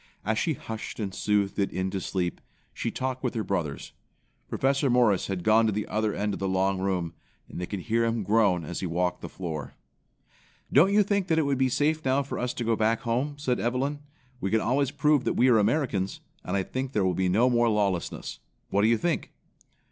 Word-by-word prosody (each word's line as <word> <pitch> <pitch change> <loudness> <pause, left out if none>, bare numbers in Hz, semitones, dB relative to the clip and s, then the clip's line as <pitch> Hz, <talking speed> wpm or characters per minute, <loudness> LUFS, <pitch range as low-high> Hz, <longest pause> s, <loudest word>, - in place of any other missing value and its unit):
As 110 +1 +1
she 160 - +1
hushed 110 -1 -7
and 100 -3 -3
soothed 105 0 0
it 100 - +2
into 95 +1 -2
sleep, 90 -3 -2 0.3
she - - -2
talked 130 0 -3
with 125 - -1
her 110 - -1
brothers. 80 -9 -3 0.6
Professor 135 +1 +1
Morris 120 -6 +3
had 95 -3 -3
gone 110 +2 +4
to - - +2
the 105 +1 -2
other 110 -1 -1
end 105 0 -1
of - - -5
the 95 - -1
long 95 0 +1
room, 90 -3 -1 0.3
and - - -7
they 90 - -3
could 100 -3 -4
hear 115 +4 +1
him 115 -1 0
groan 100 -5 +2
as 85 +3 -5
he 95 - -2
walked 90 +1 -1
the - - -6
floor. 80 -7 -6 1.0
"Don't 165 +9 +6
you 210 +1 +5
think 200 -2 0
that 160 -3 +2
it 160 - +3
would 140 -2 0
be 130 -1 +3
safe 155 +4 +1
now 135 +2 +2
for 135 - -5
us 125 0 -1
to 120 - -3
go 115 0 +2
back 110 +1 +1
home?" 130 +5 -1
said 130 -4 -1
Evelyn. 130 +5 -1 0.4
"We 95 - -2
can 110 - +3
always 135 +4 +1
prove 145 -1 +2
that - - +1
we 130 - +4
are 115 -3 +5
Americans, 105 -4 0 0.2
and - - -1
I 95 - 0
think 130 +5 -4
there 100 -3 +2
will 90 - +2
be 95 +1 0
no 110 +7 +4
more 120 -1 +3
lawlessness. 95 - -1 0.3
What 100 - +3
do 105 - +4
you 115 0 +4
think?" 170 +6 -1
110 Hz, 225 wpm, -27 LUFS, 95-130 Hz, 1.0 s, Don't